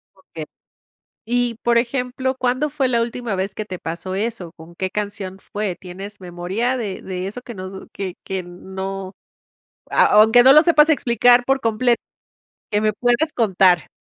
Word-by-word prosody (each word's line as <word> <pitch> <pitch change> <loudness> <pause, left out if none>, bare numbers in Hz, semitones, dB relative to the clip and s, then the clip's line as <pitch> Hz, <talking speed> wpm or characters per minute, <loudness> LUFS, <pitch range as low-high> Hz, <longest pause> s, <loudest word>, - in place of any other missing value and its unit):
Okey. 165 -4 -9 0.8
Y 240 0 0
por 235 0 +3
ejemplo, 250 +2 -1
¿cuándo 255 +4 0
fue 275 -2 0
la 235 -2 +1
última 235 -3 -3
vez 190 +1 -2
que 215 - -4
te 185 -3 -7
pasó 170 +3 -5
eso? 205 -5 -3
¿Con 165 +2 -14
qué 190 +1 -2
canción 200 -2 -5
fue? 205 -3 -4
¿Tienes 195 +3 -9
memoria 185 +8 -2
de 205 -5 -4
de 185 0 -5
eso 245 +5 -7
que 240 - -9
no 185 0 -6
d 190 0 -10
que 190 -2 -5
que 190 -1 -3
n 175 0 -10 0.2
no? 195 0 -5 0.8
A - - +4
aunque 220 +3 +6
no 265 +1 +8
lo 305 - +8
sepas 315 -2 +5
explicar 245 -3 +4
por 270 0 +2
completo, 235 +2 +1 0.7
qué 210 0 +1
me 215 -1 +1
puedas 245 +8 +1
contar. 190 -6 +3
210 Hz, 175 wpm, -20 LUFS, 190-245 Hz, 0.8 s, no